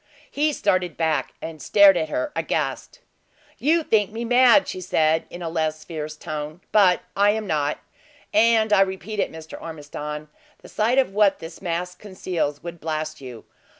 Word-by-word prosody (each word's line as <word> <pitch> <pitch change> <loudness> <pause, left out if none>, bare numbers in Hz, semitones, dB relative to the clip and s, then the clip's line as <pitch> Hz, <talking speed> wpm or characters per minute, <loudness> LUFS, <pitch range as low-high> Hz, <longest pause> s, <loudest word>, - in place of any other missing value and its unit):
He 300 +2 +1
started 185 - 0
back, 160 -2 -1
and 160 -2 -7
stared 200 +5 +6
at 160 -2 -1
her 310 - -2
aghast. - - -3 0.6
"You 320 +4 +2
think 210 -8 +2
me 225 +2 -5
mad," 250 +3 +5
she 185 - -5
said, 160 -2 +1
in 175 0 -8
a - - -3
less 155 -1 -2
fierce 155 -2 -6
tone, 155 +1 -6
"but 190 -4 +4
I 200 +1 +4
am 215 +1 0
not; 150 -5 -1 0.6
and 225 -6 +4
I 195 - +6
repeat 195 +2 -2
it, - - 0
Mr. 160 0 -10
Ormiston, 150 -1 -7 0.3
the - - -12
sight 230 +5 +1
of 260 -7 +2
what 205 -1 +3
this 165 +1 -10
mask 180 0 -3
conceals 180 -7 -3
would 170 0 -7
blast 155 -1 -4
you. 125 -4 -10
180 Hz, 170 wpm, -23 LUFS, 155-215 Hz, 0.6 s, stared